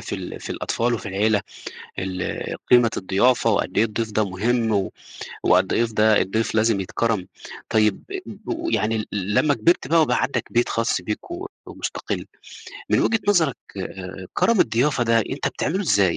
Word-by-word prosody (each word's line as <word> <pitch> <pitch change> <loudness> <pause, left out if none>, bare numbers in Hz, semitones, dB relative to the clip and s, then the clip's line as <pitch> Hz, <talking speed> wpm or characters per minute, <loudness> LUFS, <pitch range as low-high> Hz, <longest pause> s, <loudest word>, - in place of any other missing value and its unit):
في - - -5
ال - - -6
في - - -7
الأطفال 120 +1 -1
وفي 105 - -5
العيلة 105 +2 +2 0.6
ال 95 -1 -3 0.2
قيمة 120 -2 +7
الضيافة 100 +6 +2
وقد - - 0
إيه 110 - +5
الضيف 110 0 -3
ده 105 -1 0
مهم 115 +4 0
و 100 -2 0 0.5
وقد - - +3
إيه 115 - +3
ف 115 - -5
ده 110 0 +4
الضيف 110 +4 -1
لازم 110 -2 +2
يتكرَم، 105 0 -1 0.4
طيب 105 -2 +2
آآ 390 -1 -4
ب 335 0 -5
يعني 110 +1 +1
ال 110 - -3
ل 100 0 -2
لمّا 145 +6 +4
كبِرت 130 +4 +2
بقى 165 +2 +5
وبقى 155 - +1
عندك 120 -4 -1
بيت 120 +1 +2
خاص 115 -4 0
بيك 105 - -5
و 350 +3 -5 0.2
ومُستقِل، - - -4 0.6
من - - +4
وجهة 225 - +2
نظرك 165 - +3 0.2
آآ 95 0 -7
كَرَم 230 -4 +3
الضيافة 125 +2 +2
ده 115 0 +3
أنت 110 - -1
بتعمله 185 +6 -2
إزاي، 100 - +3
110 Hz, 180 wpm, -23 LUFS, 100-125 Hz, 0.6 s, قيمة